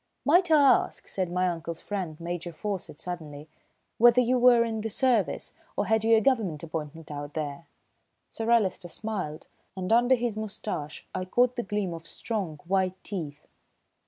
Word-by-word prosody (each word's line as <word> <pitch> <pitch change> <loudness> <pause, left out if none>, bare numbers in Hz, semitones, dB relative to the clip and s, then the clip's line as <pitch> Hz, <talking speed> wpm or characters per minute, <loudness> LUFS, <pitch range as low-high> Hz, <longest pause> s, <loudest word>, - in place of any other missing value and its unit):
"Might 350 +4 +5
I 315 - +6
ask," 280 -2 +3
said 185 -3 -2
my 180 +1 +1
uncle's 170 -1 -4
friend, 185 -7 -4
Major 175 0 -4
Faucett, 190 -2 -5
suddenly, 155 -3 -6 0.5
"whether 240 +2 +7
you 250 +1 +3
were 240 -1 +6
in 220 -1 -3
the 225 - -3
Service, 240 -2 +1 0.2
or - - +1
had 220 -1 +2
you 225 0 +5
a - - +3
Government 205 - +1
appointment 160 -1 -6
out 145 0 -6
there?" 150 0 -4 0.6
Sir 225 0 -4
Alister 195 -6 +2
smiled, 185 -7 -4 0.3
and 185 +3 0
under 245 +2 +5
his 240 -3 -2
moustache 210 -8 -5
I 185 0 -2
caught 245 +6 +2
the 240 - -1
gleam 205 -4 -2
of 165 0 -8
strong, 190 -10 -3
white 185 0 +1
teeth. 155 -8 -6
190 Hz, 165 wpm, -27 LUFS, 165-230 Hz, 0.6 s, whether